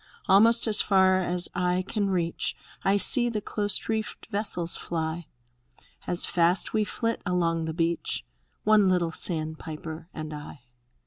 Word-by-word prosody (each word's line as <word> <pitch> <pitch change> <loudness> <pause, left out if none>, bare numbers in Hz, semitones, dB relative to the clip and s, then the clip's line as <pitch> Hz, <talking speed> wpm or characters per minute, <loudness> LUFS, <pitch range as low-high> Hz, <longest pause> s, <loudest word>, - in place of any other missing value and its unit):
Almost 225 +4 +5
as 215 -2 +3
far 190 -2 +3
as 180 0 0
eye 180 +1 -1
can 205 -3 -2
reach 170 -3 -2 0.3
I 195 +1 +2
see 240 +4 +5
the 220 -2 -3
close 205 0 -2
reefed 220 -1 -4
vessels 200 -5 +1
fly. 160 -1 -4 0.8
As 175 - +5
fast 175 +2 +1
we 215 - +1
flit 230 +2 -3
along 170 -3 -1
the 160 - -3
beach, 165 - -2 0.2
— - - -46
One 210 -2 +4
little 175 -3 0
sandpiper 160 0 -4
and 155 0 -7
I. 150 -2 -10
180 Hz, 145 wpm, -26 LUFS, 165-205 Hz, 0.8 s, Almost